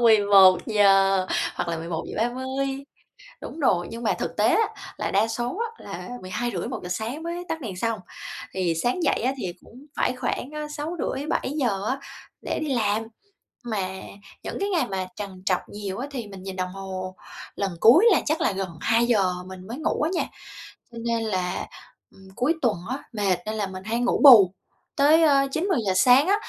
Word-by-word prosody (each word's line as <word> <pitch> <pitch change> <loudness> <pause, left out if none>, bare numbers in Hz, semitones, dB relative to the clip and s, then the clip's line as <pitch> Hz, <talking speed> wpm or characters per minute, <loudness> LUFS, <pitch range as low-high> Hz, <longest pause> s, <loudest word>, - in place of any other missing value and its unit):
11:00 195 -2 +5 0.3
hoặc - - -3
là 165 - -1
11:30. 260 +11 -3 0.6
Đúng - - -8
rồi. 175 - +2
Nhưng 230 +1 -7
mà - - +2
thực - - -3
tế - - +4
á 450 - +3 0.3
là - - -2
đa 205 +3 +3
số 240 +7 -3
á 460 -1 -5
là - - -7
12:30-1:00 185 -1 -4
sáng 225 - -3
mới 345 +1 -4
tắt 325 0 -3
đèn 215 -8 -5
xong. 230 +2 -1 0.5
Thì 180 -3 0
sáng 250 +9 0
dậy - - +2
á 260 - +2
thì 185 -8 -4
cũng 255 +5 -15
phải - - +1
khoảng, 250 +1 -3
a, 300 0 -4
6:30-7:00 290 - -2
á 265 - 0 0.4
để - - -3
đi 300 -3 -1
làm, 215 -2 +1 0.6
mà 210 -6 -2 0.5
những - - -5
cái 400 - 0
ngày 350 -4 +1
mà 190 -1 -3
trằn 195 -3 -7
trọc 185 -2 +2
nhiều 200 -2 -6
á 270 - -3
thì 245 -6 -5
mình 195 -2 -10
nhìn 190 0 -6
đồng 185 0 -2
hồ 185 -1 -6 0.4
lần 200 -1 -1
cuối 300 - +7
là 365 - +4
chắc 310 +1 0
là - - +2
gần 190 0 -3
2:00 225 -5 +3
mình 185 0 -10
mới 235 +6 -6
ngủ 315 -1 -1
á 310 - +1
nha. 345 - +1 0.7
Cho 235 - -11
nên 230 -1 0
là, 185 -4 -2 0.4
ừm, 190 0 -17
cuối 275 +7 +2
tuần 235 -5 +2
á, 265 +3 -4
mệt 200 -4 +1
nên 215 +1 -3
là 210 -2 -1
mình 185 0 -8
hay 225 +3 -1
ngủ 245 - +1
bù 215 -10 +9 0.4
tới, 305 +4 +5
ơ, 275 -3 +4
9:00-10:00 315 - 0
sáng 250 - +6
á, 400 - +4
225 Hz, 185 wpm, -25 LUFS, 190-275 Hz, 0.7 s, bù